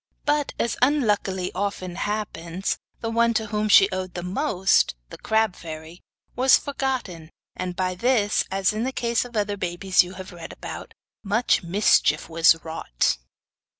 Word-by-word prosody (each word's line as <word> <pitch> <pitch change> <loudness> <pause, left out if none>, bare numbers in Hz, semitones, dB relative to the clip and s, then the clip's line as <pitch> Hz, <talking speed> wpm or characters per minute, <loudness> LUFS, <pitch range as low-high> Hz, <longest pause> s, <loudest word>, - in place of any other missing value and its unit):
But, 295 -1 +1
as 235 - -1
unluckily 210 -9 +1
often 185 -2 -3
happens, 190 -3 -3 0.2
the 225 - -2
one 235 0 +2
to 220 - +1
whom 210 0 -1
she 195 - +8
owed 185 -1 -4
the 175 - -4
most, 190 - +1 0.2
the - - -8
crab 220 -3 +1
fairy, 160 +1 -9 0.3
was 255 +1 +6
forgotten, 260 - -4 0.3
and 180 -1 -4
by 185 0 -1
this, 215 +1 +2
as 195 +1 +1
in 215 +2 -2
the 260 - -1
case 235 -1 0
of 240 -2 -7
other 205 -1 -1
babies 185 +1 +2
you 180 +1 -9
have 190 0 -9
read 170 -2 -9
about, - - -8 0.3
much 220 +4 +2
mischief 190 +5 +2
was 165 0 +5
wrought. 60 - -1
195 Hz, 155 wpm, -24 LUFS, 180-230 Hz, 0.3 s, she